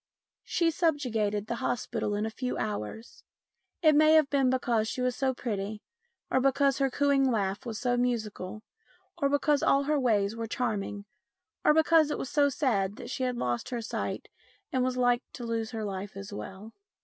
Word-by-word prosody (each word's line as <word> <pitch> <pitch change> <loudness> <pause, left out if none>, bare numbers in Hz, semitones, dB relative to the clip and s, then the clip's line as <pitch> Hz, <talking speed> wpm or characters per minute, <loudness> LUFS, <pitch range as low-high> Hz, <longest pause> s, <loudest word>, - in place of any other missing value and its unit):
She 335 -1 +1
subjugated 240 - 0
the 235 +1 -3
hospital 225 -4 -1
in 210 +1 -1
a 220 - -3
few 250 +2 -3
hours. 210 - -5 0.6
It 310 -1 +7
may 310 +1 +6
have 310 -3 +5
been 270 -2 +3
because 240 -4 +1
she 255 - -4
was 250 -1 0
so 265 -1 +1
pretty, 210 -3 -4 0.5
or 260 - +3
because 275 0 +2
her 270 -1 +2
cooing 275 0 +2
laugh 200 -1 -1
was 220 -2 -4
so 245 +1 0
musical, 215 -4 -2 0.5
or 280 -5 +1
because 285 0 +2
all 275 0 +3
her 295 +1 +1
ways 215 -4 +1
were 230 0 -4
charming, 205 -4 -2 0.6
or 300 - +5
because 320 -1 +5
it - - -1
was 265 - -5
so 290 -1 +4
sad 210 -9 0
that - - -8
she 260 - -4
had 250 -1 0
lost 120 - -2
her 245 - -3
sight 225 - -4 0.4
and 255 -1 +1
was 255 0 -1
like 245 -1 +3
to 245 - -7
lose 225 -1 -2
her 225 -3 -4
life 195 0 -5
as 195 +1 -8
well. 205 +2 -8
245 Hz, 185 wpm, -29 LUFS, 215-275 Hz, 0.6 s, It